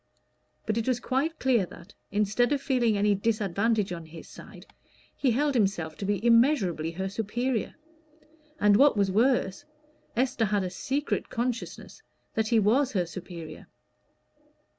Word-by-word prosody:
But 215 0 -1
it 225 - -4
was 255 -2 +1
quite 275 +6 -1
clear 250 -6 +2
that, 175 +4 -14 0.2
instead 210 +5 +1
of 290 - +2
feeling 245 -6 +1
any 205 +1 +3
disadvantage 210 -1 0
on 170 -2 -8
his 165 +1 -11
own - - -12
side, - - -13 0.5
he 270 - +1
held 285 +5 +1
himself 195 -9 0
to 200 - -5
be 205 +1 -1
immeasurably 230 - +3
her 190 +3 -3
superior: 225 +4 -2 0.8
and, 205 0 +5
what 280 -3 +5
was 200 -2 +2
worse, 230 0 +1 0.5
Esther 245 -2 +1
had 205 -1 0
a 180 - -4
secret 275 +10 -2
consciousness 240 0 -4 0.3
that 220 -1 0
he 230 - +3
was 245 +7 +2
her 180 -4 +1
superior. 170 -1 -9
215 Hz, 150 wpm, -27 LUFS, 195-250 Hz, 0.8 s, and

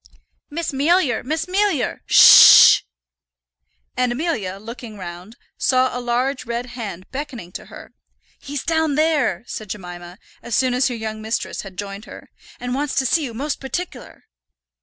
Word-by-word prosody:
"Miss 325 +2 -4
Mealyer, 285 -3 +1
Miss 315 +4 -2
Mealyer, 380 - 0
sh - - 0
sh - - +10
sh!" - - -20 1.1
And 250 -1 0
Amelia, 240 - -3
looking 230 0 -10
round, 180 +4 -10 0.2
saw 255 -1 +1
a 250 - -4
large 250 +3 -1
red 235 +1 -3
hand 200 -7 -7
beckoning 260 -10 -7
to - - -9
her. - - -13 0.5
"He's 285 -1 -6
down 320 -3 0
there," 300 - +1
said 215 -4 -8
Jemima, 175 -2 -9 0.2
as 235 - -4
soon 255 -1 +1
as 250 +2 +2
her 250 - -3
young 220 -1 -6
mistress 220 +1 -4
had 190 -2 -12
joined 200 +2 -7
her, - - -13 0.3
"and 245 0 -4
wants 285 +1 -2
to 265 - +1
see 315 +5 +1
you 240 -5 -6
most 285 +4 -3
partic'lar." 345 +7 -7
245 Hz, 160 wpm, -20 LUFS, 215-290 Hz, 1.1 s, sh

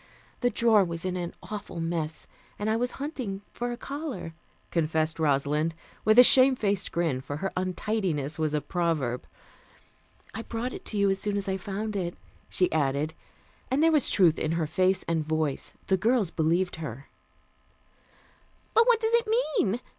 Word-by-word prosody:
The 245 - +2
drawer 225 -2 +4
was 170 -1 -5
in 185 -1 -1
an 175 -1 -3
awful 205 -5 -6
mess, 165 -1 -3 0.3
and 210 +1 -1
I - - +2
was 245 +2 -1
hunting 255 -9 -4
for 245 0 -3
a 240 - -4
collar," 275 - -5 0.4
confessed 160 -1 0
Rosalind 150 +2 +1 0.3
with 215 +2 +4
a 250 - +12
shame 260 +1 +6
faced 200 -5 0
grin, 160 -7 0
for 145 +2 -5
her 195 +4 -2
untidiness 185 -5 -1
was 155 -1 0
a 150 - 0
proverb. 155 -10 -1 1.1
"I 225 - -4
brought 235 +2 -4
it - - -9
to 215 - -4
you 200 -1 +3
as 195 - 0
soon 205 0 -1
as 200 0 -3
I 190 - 0
found 205 +3 -4
it," 175 -3 -2 0.3
she 180 - +1
added, 145 +1 0 0.6
and 275 +4 +2
there 325 - +5
was 300 -4 +3
truth 170 -5 +4
in 155 - 0
her 165 -1 0
face 185 +4 +1
and 165 -2 +1
voice. 155 -2 -2
The 190 - +2
girls 220 -2 +2
believed 170 +3 +1
her. 140 -4 -6 1.7
"But 460 +1 +5
what 480 -2 +5
does 445 0 0
it 470 -1 +3 0.3
mean?" 215 +5 +1
185 Hz, 175 wpm, -27 LUFS, 160-220 Hz, 1.7 s, a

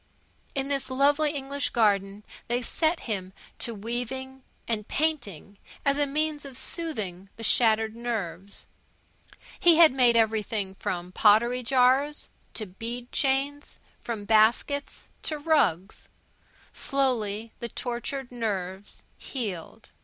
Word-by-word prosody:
In 270 0 -1
the 275 -1 0
lovely 285 +3 +3
English 280 -1 -2
garden 200 -2 +1 0.2
they 245 +1 0
set 320 +7 0
him 190 -4 -4 0.3
to 235 - -1
weaving 245 +5 -4 0.3
and 215 -3 -2
painting, 205 - -2 0.3
as 280 +1 +2
a 290 - +2
means 300 +1 -1
of 270 -3 -8
soothing 215 - -4
the 225 - -9
shattered 220 -1 +3
nerves. 200 -6 -4 0.9
He 345 -1 +7
had 320 -3 +7
made 245 -3 +5
everything 220 -3 +1
from 180 -2 -4
pottery 225 +6 +4
jars 260 +4 +2 0.2
to 215 - -3
bead 235 +6 -6
chains; 280 +1 0 0.2
from 220 -4 -5
baskets 225 +7 +2
to 305 - -2
rugs. 290 - +1 0.6
Slowly 230 -6 -1
the 235 - -4
tortured 245 +3 -4
nerves 200 -4 -4
healed. 205 - -5
240 Hz, 115 wpm, -27 LUFS, 210-275 Hz, 0.9 s, He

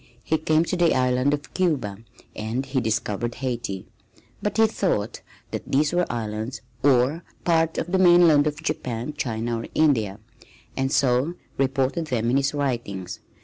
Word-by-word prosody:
He 160 - 0
came 155 +1 +2
to 185 - -1
the 175 -2 +3
island 125 +1 +2
of 145 0 -4
Cuba 135 - 0 0.4
and 110 +5 -3
he 130 -1 -1
discovered 115 0 -1
Haiti, 120 -7 -3 0.6
but 210 - -2
he 225 - +6
thought 180 - -1 0.3
that - - -5
these 145 +3 +2
were 175 0 +1
islands 110 +1 -4 0.2
or 140 +4 +3 0.2
part 165 -1 +2
of 175 - -2
the 190 - +2
mainland 175 -5 +6
of 150 +1 -4
Japan, 125 -3 -3
China 115 -4 -2
or 115 - -6
India, 110 -10 +2 0.6
and 135 0 -1
so 135 +5 +2 0.2
reported 135 +4 0
them 120 -3 0
in 130 - +3
his 140 0 +1
writings. 120 -10 -3
135 Hz, 155 wpm, -24 LUFS, 115-155 Hz, 0.6 s, he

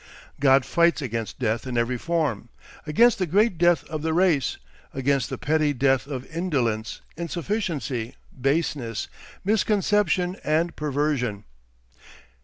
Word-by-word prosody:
God 135 -1 +5
fights 170 -1 +3
against 115 -3 -4
death 115 -1 -1
in 125 -2 -3
every 120 +1 0
form, 150 -10 -1 0.4
against 230 +10 +4
the 185 - 0
great 195 +1 +2
death 175 0 +4
of 155 -1 -5
the 160 +1 -1
race, 170 -5 +2 0.4
against 135 -2 +1
the - - -4
petty 150 +2 +1
death 135 0 +2
of 130 -3 -5
indolence, 120 -11 -1 0.2
insufficiency, 165 - -3 0.2
baseness, 135 -4 -1 0.4
misconception, 205 -3 +1
and 165 +3 +1
perversion. 140 -8 -1
150 Hz, 120 wpm, -24 LUFS, 125-170 Hz, 0.4 s, God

